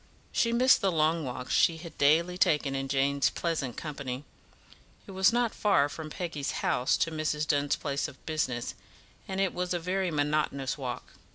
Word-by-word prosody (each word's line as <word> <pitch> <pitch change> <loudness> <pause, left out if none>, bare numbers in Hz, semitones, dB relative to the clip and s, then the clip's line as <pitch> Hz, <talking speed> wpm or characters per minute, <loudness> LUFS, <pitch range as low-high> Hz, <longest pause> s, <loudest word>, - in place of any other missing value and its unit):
She 230 - +2
missed 250 +3 +5
the 195 - +2
long 160 0 +2
walks 125 0 -4
she 165 - +4
had 165 0 -10
daily 165 +5 +4
taken 150 -5 +2
in 135 0 -2
Jane's 140 +1 +2
pleasant 155 -8 -3
company. 140 -3 -5 0.8
It - - -10
was 190 +1 +4
not 240 -1 +1
far 200 -9 +3
from 155 +2 -7
Peggy's 155 -4 -4
house 125 +2 +2
to 165 - 0
Mrs. 155 -1 -1
Dunn's 145 -1 +2
place 140 -1 -2
of - - -14
business, 130 -6 -2 0.5
and 190 0 -3
it 195 -2 +1
was 180 0 -2
a - - -1
very 185 +2 -1
monotonous 145 -3 0
walk. 130 -4 -6
155 Hz, 175 wpm, -29 LUFS, 140-180 Hz, 0.8 s, missed